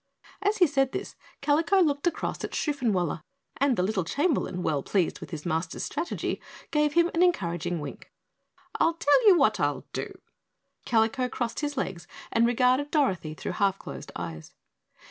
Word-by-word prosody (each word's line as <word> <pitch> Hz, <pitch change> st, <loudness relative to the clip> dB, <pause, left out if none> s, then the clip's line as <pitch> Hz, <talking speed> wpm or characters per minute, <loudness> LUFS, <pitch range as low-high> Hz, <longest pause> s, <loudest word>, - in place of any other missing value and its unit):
As 415 Hz, +1 st, +1 dB
he 360 Hz, -, +6 dB
said 270 Hz, -4 st, +1 dB
this, -, -, -5 dB, 0.3 s
Kalico 325 Hz, +7 st, +3 dB
looked 295 Hz, -2 st, +2 dB
across 345 Hz, -, -2 dB
at -, -, -4 dB
Shoofenwaller, 215 Hz, -, 0 dB, 0.4 s
and 275 Hz, -3 st, +2 dB
the 180 Hz, -, +2 dB
little 195 Hz, -1 st, 0 dB
Chamberlain, 225 Hz, -, 0 dB
well 150 Hz, -3 st, 0 dB
pleased 185 Hz, +3 st, 0 dB
with -, -, -9 dB
his 160 Hz, -4 st, -7 dB
master's 165 Hz, 0 st, -2 dB
strategy, 325 Hz, +4 st, -3 dB, 0.3 s
gave 300 Hz, -1 st, +2 dB
him 340 Hz, +1 st, +3 dB
an 335 Hz, -, +1 dB
encouraging 175 Hz, -, +1 dB
wink. 145 Hz, -2 st, -8 dB, 0.7 s
"I 330 Hz, -, +4 dB
tell 335 Hz, +10 st, +4 dB
you 380 Hz, -4 st, +8 dB
what 220 Hz, -, +3 dB
I'll 145 Hz, -1 st, 0 dB
do," -, -, -3 dB, 0.8 s
Kalico 235 Hz, +3 st, +2 dB
crossed 235 Hz, -2 st, -3 dB
his 290 Hz, -2 st, -3 dB
legs 175 Hz, -8 st, -3 dB, 0.2 s
and 230 Hz, 0 st, +4 dB
regarded 250 Hz, +4 st, +2 dB
Dorothy 190 Hz, -, 0 dB
through -, -, -4 dB
half 195 Hz, -2 st, +1 dB
closed -, -, -9 dB
eyes. 80 Hz, -2 st, -7 dB
245 Hz, 165 wpm, -27 LUFS, 175-295 Hz, 0.8 s, you